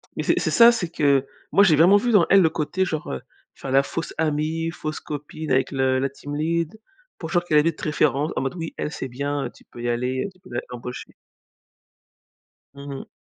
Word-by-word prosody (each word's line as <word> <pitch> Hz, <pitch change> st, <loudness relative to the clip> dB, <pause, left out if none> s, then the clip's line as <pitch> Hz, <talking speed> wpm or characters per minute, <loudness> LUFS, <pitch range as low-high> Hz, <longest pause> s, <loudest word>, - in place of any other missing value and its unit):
Mais -, -, -2 dB
c'est -, -, +2 dB
c'est -, -, -1 dB
ça, 235 Hz, 0 st, +8 dB
c'est 185 Hz, -8 st, -2 dB
que 140 Hz, -5 st, +2 dB, 0.3 s
moi, 200 Hz, -, +6 dB
j'ai 165 Hz, -6 st, +5 dB
vraiment 180 Hz, +7 st, +6 dB
vu 240 Hz, +3 st, 0 dB
dans 190 Hz, -6 st, +5 dB
elle 195 Hz, -1 st, +7 dB
le 160 Hz, -, +4 dB
côté 180 Hz, +5 st, -1 dB
genre, 155 Hz, -3 st, -4 dB
heu, 65 Hz, -, -4 dB, 0.3 s
faire 135 Hz, -, -7 dB
la 135 Hz, +1 st, +5 dB
fausse 165 Hz, +4 st, -5 dB
amie, 160 Hz, +1 st, 0 dB
fausse 155 Hz, -2 st, -5 dB
copine 150 Hz, 0 st, -6 dB
avec 130 Hz, +2 st, +2 dB
le 130 Hz, -1 st, +1 dB
la 135 Hz, 0 st, 0 dB
team 145 Hz, +1 st, -8 dB
lead. 165 Hz, +5 st, -1 dB, 0.4 s
Pour 160 Hz, -, -6 dB
genre 175 Hz, -1 st, +2 dB
qu'elle 155 Hz, -3 st, +2 dB
allait 155 Hz, +3 st, +4 dB
être 160 Hz, -, -7 dB
référente, 150 Hz, 0 st, +1 dB
en -, -, 0 dB
mode: 135 Hz, -, -2 dB
«Oui, 165 Hz, -2 st, -6 dB
elle 150 Hz, -, -3 dB
c'est 130 Hz, -, -5 dB
bien, 140 Hz, +3 st, -2 dB
heu, -, -, -4 dB
tu -, -, -20 dB
peux 120 Hz, -, -12 dB
y 120 Hz, -, -1 dB
aller, 125 Hz, +2 st, -1 dB
heu, -, -, -4 dB
tu 185 Hz, -, -27 dB
peux 185 Hz, -, -17 dB, 0.2 s
l'embaucher». 125 Hz, 0 st, -7 dB, 1.6 s
Mmh 140 Hz, 0 st, -9 dB
mh. 135 Hz, -, -8 dB
150 Hz, 225 wpm, -23 LUFS, 135-170 Hz, 1.6 s, ça